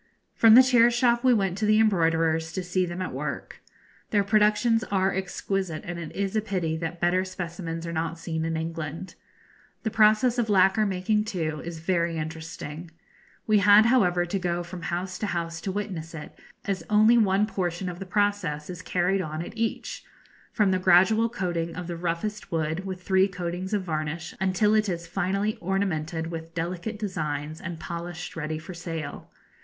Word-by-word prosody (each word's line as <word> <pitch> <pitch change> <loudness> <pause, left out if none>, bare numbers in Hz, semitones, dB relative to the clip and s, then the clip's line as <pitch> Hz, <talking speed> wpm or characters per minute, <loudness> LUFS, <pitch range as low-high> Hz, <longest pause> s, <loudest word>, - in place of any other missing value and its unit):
From 225 -1 +7
the 255 - +10
chair 240 -2 +5
shop 240 0 +2
we 255 - +5
went 195 -5 +1
to 215 - +1
the 215 0 +5
embroiderers, 165 -5 +2
to 185 - -3
see 180 +1 0
them 175 +2 -4
at - - -5
work. - - -5 0.5
Their 205 -2 +2
productions 215 +3 +3
are 195 -1 +1
exquisite, 190 -2 -3
and 175 0 -5
it 165 -2 -6
is 200 +1 -2
a 215 - +2
pity 185 -7 -2
that 165 +1 -4
better 175 +2 +2
specimens 170 -2 -5
are 170 - -4
not 165 +1 -2
seen 160 -1 -3
in 165 0 -1
England. 165 +2 -5 0.7
The 220 - -1
process 220 +3 +4
of 230 -2 0
lacquer 195 +2 +4
making, 200 +3 0
too, 160 -7 -3
is 170 -1 -6
very 170 0 0
interesting. 160 0 -6 0.6
We 215 -1 +4
had, 205 +2 +7
however, 180 -8 +3
to 195 +3 -2
go 175 -1 -1
from 175 0 -8
house 180 +2 -3
to 210 - -1
house 165 -2 -3
to 195 - -3
witness 185 -5 -5
it, 150 - -8 0.3
as 195 -2 -2
only 215 +3 +6
one 200 -1 +3
portion 180 -3 -3
of 175 -1 -5
the 195 - -7
process 185 -6 0
is 175 -1 -8
carried 180 +3 +1
on 155 -1 -4
at - - -10
each 225 0 -3 0.5
from 205 -3 +2
the 185 - +1
gradual 190 +5 +5
coating 175 -7 -3
of 180 +1 -5
the 170 0 -4
roughest 175 +5 -3
wood 160 +3 -1
with 185 -1 -6
three 190 0 +3
coatings 180 0 -4
of 205 -3 0
varnish, 160 -1 -3
until 190 +3 +2
it 215 -1 +2
is 170 -2 -3
finally 195 +4 -1
ornamented 170 -3 -2
with 165 0 -7
delicate 175 +6 -3
designs, 155 -6 -4
and 175 -3 -6
polished 170 +1 -6
ready 155 -1 -3
for 170 +4 -8
sale. 165 -3 -6
180 Hz, 180 wpm, -26 LUFS, 165-205 Hz, 0.7 s, the